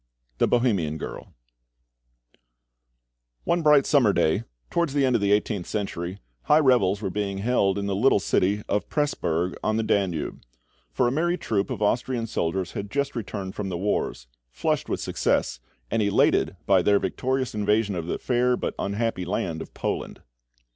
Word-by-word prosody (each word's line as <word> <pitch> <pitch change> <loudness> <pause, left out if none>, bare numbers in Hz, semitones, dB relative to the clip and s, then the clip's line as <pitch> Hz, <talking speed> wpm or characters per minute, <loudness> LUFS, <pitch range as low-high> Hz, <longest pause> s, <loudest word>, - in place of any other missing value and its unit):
THE - - +4
BOHEMIAN 100 -11 +1
GIRL - - -7 2.1
One 175 - +1
bright 150 -3 +5
summer 125 -9 +4
day, 95 +9 +1 0.3
towards 170 -5 0
the 140 -2 +3
end 130 -2 +2
of 115 - +1
the 100 0 +2
eighteenth 105 -3 0
century, 95 -3 -3 0.3
high 150 - +5
revels 110 -8 +3
were 95 - -1
being 100 0 -2
held 100 -2 +1
in 100 - -2
the 100 -1 -1
little 110 +2 +4
city 100 +2 +1
of 105 - -1
Presburg, 90 - 0
on 110 0 +1
the 110 - +1
Danube; 95 -7 -1 0.5
for 90 - +1
a - - +1
merry 170 +5 +1
troupe 100 - -1
of - - -3
Austrian 120 +2 0
soldiers 90 -3 -2
had 100 0 -5
just 140 +3 -1
returned 100 -4 -5
from 100 -2 -4
the 90 - -3
wars, 95 -9 -2 0.2
flushed - - -1
with - - -1
success, - - 0 0.3
and 115 - +1
elated 100 -2 +2
by 95 -2 +4
their 100 +3 +4
victorious 130 +7 -1
invasion 105 0 +1
of 85 -2 -4
the - - -2
fair, 125 0 +1
but - - -3
unhappy 100 -1 -1
land 85 -3 -2
of - - -9
Poland. - - -4
105 Hz, 170 wpm, -25 LUFS, 95-125 Hz, 2.1 s, bright